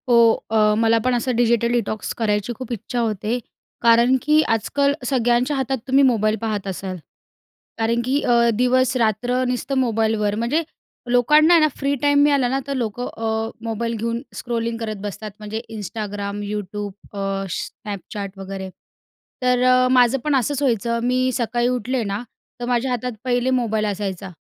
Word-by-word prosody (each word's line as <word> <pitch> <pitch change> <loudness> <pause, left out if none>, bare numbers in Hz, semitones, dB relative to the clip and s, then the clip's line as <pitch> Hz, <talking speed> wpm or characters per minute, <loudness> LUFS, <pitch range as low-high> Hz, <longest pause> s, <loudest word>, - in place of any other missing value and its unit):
हो. 235 -2 +5
अ, 215 -1 +4
मला 225 0 +3
पण 255 - +2
असं 245 +1 -1
डिजिटल 235 0 +2
डिटॉक्स 225 -3 -2
करायची 210 0 0
खूप 255 -2 -7
इच्छा 235 +2 -4
होते. 220 +1 -1 0.4
कारण 235 +2 +5
की 305 +1 +4
आजकाल 280 +6 +1
सगळ्यांच्या 245 +2 +1
हातात 265 0 -1
तुम्ही 270 +1 +4
मोबाईल 220 -4 +3
पाहत 210 -3 -2
असाल, 190 0 -4 0.8
कारण 230 +1 +1
की 275 +3 +1
अ, 235 -1 +4
दिवस-रात्र 250 0 +1
नुसतं 250 +2 -2
मोबाईलवर 220 -4 +1
म्हणजे 240 +9 0 0.5
लोकांना 300 +7 +5
आहे 335 - +6
ना, 310 - +5
फ्री 280 0 0
टाईम 285 0 +4
मिळाला 280 -3 +3
ना, 270 +2 0
तर 280 - -2
लोकं 245 0 -3
अ, 220 0 -1 0.2
मोबाईल 230 +1 -2
घेऊन 230 +2 -2
स्क्रोलिंग 230 -1 -2
करत 220 -2 -3
बसतात 210 +1 -6
म्हणजे 215 +1 -5
Instagram, 205 -1 -5
YouTube 205 0 -4 0.2
अ, 195 -1 -2
Snapchat 200 -2 -7
वगैरे. 190 0 -6 0.7
तर 250 0 +3
अ, 255 0 +5
माझं 250 +1 +4
पण 300 -2 +2
असंच 270 +2 0
व्हायचं 235 -3 +1
मी 255 +1 +1
सकाळी 240 0 0
उठले 250 0 -1
ना, 200 +1 -3 0.4
तर 240 - -3
माझ्या 245 +1 0
हातात 250 0 -2
पहिले 245 0 +1
मोबाईल 225 -4 +1
असायचा 195 -2 -3
235 Hz, 155 wpm, -21 LUFS, 215-255 Hz, 0.8 s, आहे